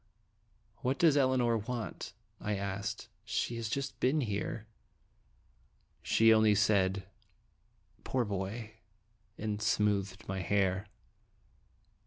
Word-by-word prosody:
" 110 Hz, +1 st, -39 dB
What 130 Hz, +2 st, 0 dB
does 160 Hz, -4 st, +5 dB
Elinor 130 Hz, -4 st, +3 dB
want?" 115 Hz, +1 st, -5 dB, 0.3 s
I 105 Hz, 0 st, -1 dB
asked. 100 Hz, +3 st, -4 dB, 0.2 s
"She 115 Hz, +1 st, -1 dB
has 115 Hz, -1 st, -3 dB
just 140 Hz, +4 st, -3 dB
been 145 Hz, +4 st, +2 dB
here." 105 Hz, -1 st, -3 dB, 1.4 s
She 115 Hz, 0 st, +5 dB
only 110 Hz, -1 st, +5 dB
said, 95 Hz, -2 st, +2 dB, 1.0 s
"Poor 125 Hz, -2 st, 0 dB
boy!" 105 Hz, +3 st, -4 dB, 0.6 s
and 105 Hz, -1 st, -3 dB
smoothed 105 Hz, -1 st, 0 dB
my 95 Hz, -1 st, -2 dB
hair. 95 Hz, +1 st, +1 dB
110 Hz, 105 wpm, -32 LUFS, 100-115 Hz, 1.4 s, does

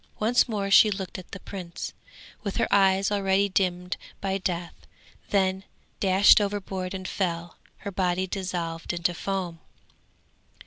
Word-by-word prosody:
Once 240 Hz, +4 st, +3 dB
more 200 Hz, -3 st, -2 dB
she 215 Hz, -, +8 dB
looked 195 Hz, -2 st, -4 dB
at 180 Hz, -, -12 dB
the 195 Hz, -, -7 dB
prince, 180 Hz, -3 st, -7 dB, 0.5 s
with 200 Hz, -2 st, -4 dB
her -, -, +2 dB
eyes 195 Hz, 0 st, +4 dB
already 200 Hz, 0 st, +2 dB
dimmed 180 Hz, -2 st, 0 dB, 0.2 s
by 195 Hz, -1 st, -1 dB
death, 175 Hz, -3 st, -3 dB, 0.6 s
then 190 Hz, -1 st, +1 dB, 0.4 s
dashed 195 Hz, +2 st, +6 dB
overboard 195 Hz, -2 st, -3 dB
and 185 Hz, -1 st, -5 dB
fell, 170 Hz, -3 st, -3 dB, 0.2 s
her 200 Hz, -, -6 dB
body 185 Hz, -1 st, 0 dB
dissolving 175 Hz, -3 st, -3 dB
into 175 Hz, +1 st, +1 dB
foam. 180 Hz, -2 st, -3 dB
190 Hz, 135 wpm, -26 LUFS, 180-200 Hz, 0.6 s, she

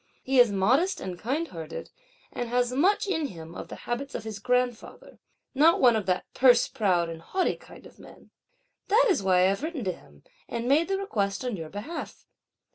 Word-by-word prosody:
He 265 Hz, 0 st, +2 dB
is 240 Hz, -3 st, +6 dB
modest 255 Hz, -, +2 dB
and 185 Hz, -1 st, -5 dB
kindhearted, 220 Hz, -, -4 dB, 0.4 s
and 240 Hz, -, -4 dB
has 245 Hz, 0 st, +1 dB
much 400 Hz, +10 st, +2 dB
in 320 Hz, -7 st, -1 dB
him 165 Hz, -6 st, -10 dB
of -, -, -8 dB
the -, -, -8 dB
habits 255 Hz, +4 st, -4 dB
of -, -, -4 dB
his 220 Hz, -2 st, -6 dB
grandfather; 250 Hz, 0 st, -2 dB, 0.3 s
not 305 Hz, +5 st, +5 dB
one 245 Hz, -3 st, +5 dB
of 210 Hz, -3 st, -2 dB
that 185 Hz, 0 st, 0 dB
purse 250 Hz, -2 st, +5 dB
proud 185 Hz, -9 st, +1 dB
and 165 Hz, -1 st, -7 dB
haughty 370 Hz, -, -1 dB
kind -, -, -15 dB
of -, -, -16 dB
men. -, -, -16 dB, 0.6 s
That 455 Hz, +5 st, +4 dB
is 355 Hz, -, +1 dB
why 185 Hz, -2 st, +3 dB
I 185 Hz, -, +5 dB
have 195 Hz, +4 st, -1 dB
written 315 Hz, -4 st, -4 dB
to 185 Hz, -, 0 dB
him 75 Hz, -, -16 dB, 0.3 s
and 235 Hz, 0 st, -3 dB
made 300 Hz, +5 st, +3 dB
the 390 Hz, 0 st, 0 dB
request 215 Hz, -, -2 dB
on 245 Hz, -4 st, -2 dB
your 160 Hz, -4 st, -7 dB
behalf. 215 Hz, -, -7 dB
240 Hz, 200 wpm, -27 LUFS, 190-290 Hz, 0.6 s, is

